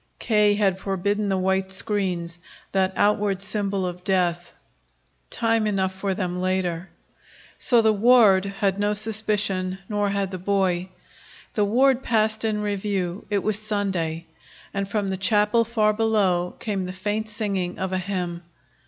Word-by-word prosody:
K. 210 -2 +3
had 195 -3 +1
forbidden 200 +2 -1
the 190 - +1
white 190 0 0
screens, 185 -4 -2 0.3
that 190 -1 +1
outward 205 -2 +1
symbol 200 -2 -1
of 180 0 -5
death. 175 -2 0 0.8
Time 225 -1 +1
enough 190 -2 0
for 195 0 -2
them 180 -2 -3
later. 185 -1 -1 0.7
So 235 -3 +4
the 220 0 +4
ward 210 -3 +5
had 195 0 -1
no 205 +1 +1
suspicion, 205 -3 -1
nor 205 -1 0
had 200 -1 -1
the 185 - -5
boy. 185 -1 0 0.6
The 210 -4 +2
ward 255 +5 +3
passed 220 -2 +1
in 215 -1 0
review. 195 -3 -2
It 205 -2 0
was 215 -1 -1
Sunday, 190 -6 -2 0.5
and 200 0 -2
from 205 -2 -1
the 190 - -2
chapel 210 +4 +3
far 215 -2 +1
below 205 -5 +1
came 200 -4 -2
the 185 - -5
faint 210 +3 -3
singing 200 -5 -2
of 190 0 -3
a 185 - +1
hymn. 180 -2 -3
200 Hz, 150 wpm, -24 LUFS, 185-210 Hz, 0.8 s, ward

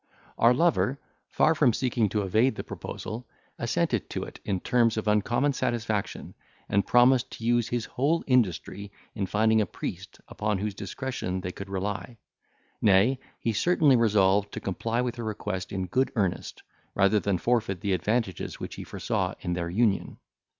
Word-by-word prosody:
Our 115 - +6
lover, 140 -1 +2 0.3
far 160 - +3
from 145 -7 +3
seeking 120 -4 0
to 105 +1 -1
evade 110 +6 +2
the - - -5
proposal, 115 +3 -7 0.3
assented - - 0
to - - -3
it - - -10
in 95 -2 -1
terms 115 +2 +2
of 110 - -2
uncommon 120 +7 +2
satisfaction, 115 -5 -2 0.3
and 100 0 +1
promised 125 +1 +5
to 115 - -7
use 120 -1 +2
his 120 -2 -1
whole 150 +6 0
industry 100 - 0 0.2
in 100 -4 -2
finding 110 +2 +3
a 105 - 0
priest - - -7
upon 105 -1 -1
whose 105 +2 -3
discretion 100 -2 -4
they 90 0 -4
could 100 +1 -9
rely; 100 +4 -4 0.6
nay, 110 +6 +4 0.2
he 115 - -1
certainly 150 +2 +4
resolved 105 -3 +3
to - - -4
comply 115 +5 -2
with 125 0 -3
her 120 - -4
request 100 -3 -4
in 95 -1 -2
good 130 +9 0
earnest, 95 -6 -2 0.3
rather 100 +2 +4
than 100 -2 0
forfeit 105 -3 0
the 100 - 0
advantages 105 0 -1
which - - -6
he - - -7
foresaw - - -2
in 90 - -2
their 85 -1 -2
union. 100 +2 +1
110 Hz, 165 wpm, -27 LUFS, 100-120 Hz, 0.6 s, Our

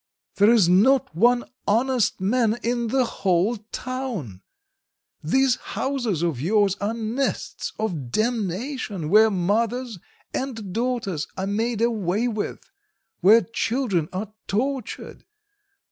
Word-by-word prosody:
There 205 +2 +6
is 225 -7 +5
not 215 - +4
one 240 +6 +4 0.2
honest 240 +1 +2
man 225 +3 +1
in 235 0 0
the 260 +2 +2
whole 195 +2 +1
town! 240 - -5 0.8
These 260 - +3
houses 245 - -2
of 160 -8 -1
yours 200 +3 +2
are 210 +3 -1
nests 230 +4 -2
of 170 - -3
damnation, 215 - -2
where 215 +4 +6
mothers 220 +4 -1 0.3
and 225 -8 -4
daughters 230 -9 -2
are 190 - -2
made 225 +3 -1
away 220 -1 0
with, 220 -3 -4 0.5
where 215 +6 +7
children 225 - -1
are 200 +3 -5
tortured. 260 +3 -3
220 Hz, 115 wpm, -24 LUFS, 190-245 Hz, 0.8 s, where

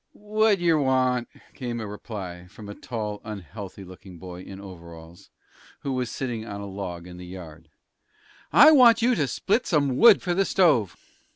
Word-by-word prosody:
"What 215 0 +1
yer 170 -3 +2
want?" 130 -3 +1 0.3
came 120 -3 -5
as - - -5
a - - -6
reply 95 -4 -8
from 105 +3 -12
a 105 - -7
tall, 105 -2 -6
unhealthy 100 -1 -9
looking 95 0 -13
boy 90 0 -9
in 95 +1 -10
overalls, 85 -3 -13 0.5
who 135 - -3
was 125 -2 -2
sitting 120 -4 -4
on 100 -3 -7
a 100 - -6
log 95 -3 -7
in 90 -1 -11
the 90 - -9
yard. 85 -3 -11 0.8
"I 305 - +8
want 235 -6 +6
you 250 +1 +4
to 150 - 0
split 205 - -1
some 140 -6 +1
wood 230 +2 +7
for 180 - 0
the 195 +3 +2
stove." 150 - +2
110 Hz, 180 wpm, -25 LUFS, 95-150 Hz, 0.8 s, I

